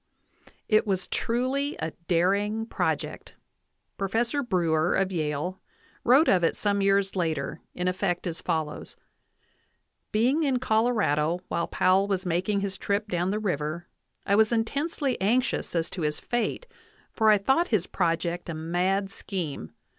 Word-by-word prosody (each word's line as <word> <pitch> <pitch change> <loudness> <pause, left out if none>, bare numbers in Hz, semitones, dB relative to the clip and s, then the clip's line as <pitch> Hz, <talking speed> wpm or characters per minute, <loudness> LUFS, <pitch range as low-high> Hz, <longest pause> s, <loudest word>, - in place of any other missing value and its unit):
It 215 0 +3
was 190 -2 0
truly 260 +5 -1
a 160 - -3 0.2
daring 200 +5 +1
project. - - -3 0.6
Professor 230 +8 0
Brewer, 175 - +1
of 195 0 +1
Yale, 155 +2 -2 0.4
wrote 270 +7 +5
of 180 -2 +4
it 165 - +2
some 200 -1 +1
years 195 0 +2
later* 160 -4 -2
in 180 - -2
effect 180 -1 -1
as 170 -2 -4
follows: 160 -3 -3 1.2
Being 250 +9 +2
in 275 -4 +2
Colorado 215 - +1
while 170 - -1
Powell 190 +2 +3
was 190 -2 -1
making 185 +4 0
his 195 -1 -3
trip 205 +1 -1
down 175 0 0
the 205 - 0
river, 170 -5 -2 0.4
I 200 - +1
was 215 +2 +4
intensely 275 - -1
anxious 240 0 +1
as 165 -1 +1
to 180 - -5
his 150 -1 -1
fate, 240 - -2 0.5
for 220 -2 +3
I 210 - +7
thought 265 - +2
his 210 -6 +1
project 170 0 -1
a 165 - -3
mad 180 +5 0
scheme. 160 - -5
195 Hz, 145 wpm, -27 LUFS, 170-220 Hz, 1.2 s, I